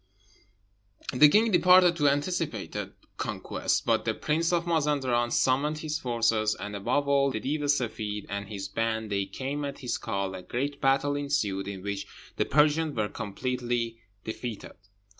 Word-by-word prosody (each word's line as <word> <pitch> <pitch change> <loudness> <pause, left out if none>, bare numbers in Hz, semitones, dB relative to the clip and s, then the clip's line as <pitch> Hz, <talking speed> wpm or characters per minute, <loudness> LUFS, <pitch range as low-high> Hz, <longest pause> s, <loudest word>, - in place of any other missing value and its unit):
The 150 +4 +7
king 220 +7 +4
departed 180 -1 +6
to 145 -3 +4
anticipated 160 +4 -2 0.2
conquest; - - -2
but - - +2
the - - -1
prince 165 +3 0
of 170 -1 +1
Mazenderan 140 -7 +1
summoned 140 +5 +1
his 155 0 -3
forces, 115 -4 +1
and, 105 0 -5
above 140 +8 0
all, 140 0 +3
the 110 - -3
Deev 145 +7 -2
e 145 - -1
Seffeed 110 -7 -1
and 100 +1 -5
his 100 -2 -5
band. 110 0 -2
They 100 -1 0
came 140 +2 -4
at 140 -1 -4
his 125 - -3
call: 100 -1 -2
a 95 - -6
great 140 +9 -3
battle 135 +1 +2
ensued, 105 -10 -1
in 95 -2 -6
which 100 0 -4 0.3
the - - +2
Persians 150 0 +2
were 105 -1 0
completely 120 +1 -3 0.2
defeated. 110 0 -6
130 Hz, 160 wpm, -28 LUFS, 110-145 Hz, 0.3 s, The